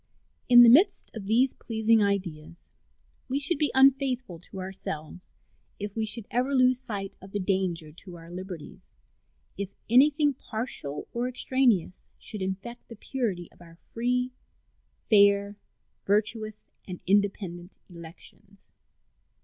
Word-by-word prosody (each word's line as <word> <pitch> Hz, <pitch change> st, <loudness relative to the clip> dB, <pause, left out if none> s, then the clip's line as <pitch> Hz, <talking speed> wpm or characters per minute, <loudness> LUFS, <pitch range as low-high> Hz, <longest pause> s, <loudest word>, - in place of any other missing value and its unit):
In 240 Hz, -1 st, +9 dB
the 235 Hz, -, +8 dB
midst 365 Hz, -, +4 dB
of 200 Hz, -3 st, -7 dB
these 245 Hz, +5 st, +3 dB
pleasing 220 Hz, -1 st, +1 dB
ideas 175 Hz, -5 st, -3 dB, 0.6 s
we 270 Hz, +2 st, 0 dB
should 290 Hz, +2 st, +3 dB
be 300 Hz, -, +2 dB
unfaithful 265 Hz, -, +3 dB
to 185 Hz, +2 st, -10 dB
ourselves 185 Hz, -3 st, -6 dB, 0.5 s
if 205 Hz, 0 st, -6 dB
we 220 Hz, -1 st, -1 dB
should 215 Hz, 0 st, +1 dB
ever 255 Hz, +3 st, 0 dB
lose 255 Hz, -1 st, +4 dB
sight 200 Hz, -6 st, -5 dB
of 190 Hz, +1 st, -13 dB
the 205 Hz, -, -1 dB
danger 185 Hz, -5 st, -1 dB
to 175 Hz, +3 st, -12 dB
our 165 Hz, 0 st, -12 dB
liberties 180 Hz, -3 st, -8 dB, 0.8 s
if 200 Hz, -2 st, -3 dB, 0.2 s
anything 290 Hz, +3 st, +5 dB
partial 220 Hz, -, -5 dB
or 240 Hz, +1 st, -1 dB
extraneous 250 Hz, -8 st, 0 dB
should 210 Hz, -, -7 dB
infect 195 Hz, +6 st, -5 dB
the 230 Hz, -, -10 dB
purity 205 Hz, -7 st, -3 dB
of -, -, -23 dB
our 165 Hz, -1 st, -15 dB
free, 250 Hz, +6 st, -2 dB, 0.8 s
fair, 200 Hz, -1 st, +4 dB, 0.5 s
virtuous, 215 Hz, +1 st, 0 dB, 0.2 s
and 180 Hz, -2 st, -7 dB
independent 190 Hz, -2 st, -1 dB
elections. 170 Hz, -2 st, -13 dB
205 Hz, 130 wpm, -27 LUFS, 185-250 Hz, 0.8 s, In